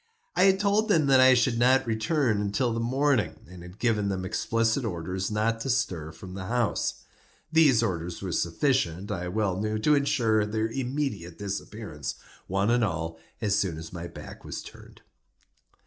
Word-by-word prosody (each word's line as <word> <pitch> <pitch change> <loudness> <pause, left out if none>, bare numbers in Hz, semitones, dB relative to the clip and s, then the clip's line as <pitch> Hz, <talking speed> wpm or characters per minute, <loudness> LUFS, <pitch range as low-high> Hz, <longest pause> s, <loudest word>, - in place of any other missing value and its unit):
I 180 - +5
had 190 0 +4
told 205 +2 +2
them 160 -7 +4
that 135 -1 +5
I 130 0 +7
should 120 -1 +2
not 130 +2 +4
return 115 0 +1
until 105 +4 0
the 115 - -2
morning, 125 - +1
and 90 -1 -12
had 90 +2 -11
given 105 -4 +1
them 95 -1 -2
explicit 115 +5 0
orders 95 -2 -3
not 110 +1 0
to 135 - -3
stir 85 -10 -1
from 90 +3 -10
the 95 -1 -6
house. 120 -1 -1 0.5
These 145 -8 +5
orders 90 -5 -3
were 95 -2 -4
sufficient, 90 - 0
I 90 0 -3
well 95 -1 -1
knew, 110 0 -1
to 150 +8 +3
insure 125 -7 +2
their 110 +1 -1
immediate 125 - -3
disappearance, 100 - -5 0.3
one 100 +4 +1
and 120 0 +3
all, 80 -4 -2 0.2
as 105 -3 +1
soon 90 -6 -1
as 80 +1 -9
my 85 -1 -5
back - - -11
was - - -6
turned. - - -14
110 Hz, 175 wpm, -27 LUFS, 95-130 Hz, 0.5 s, I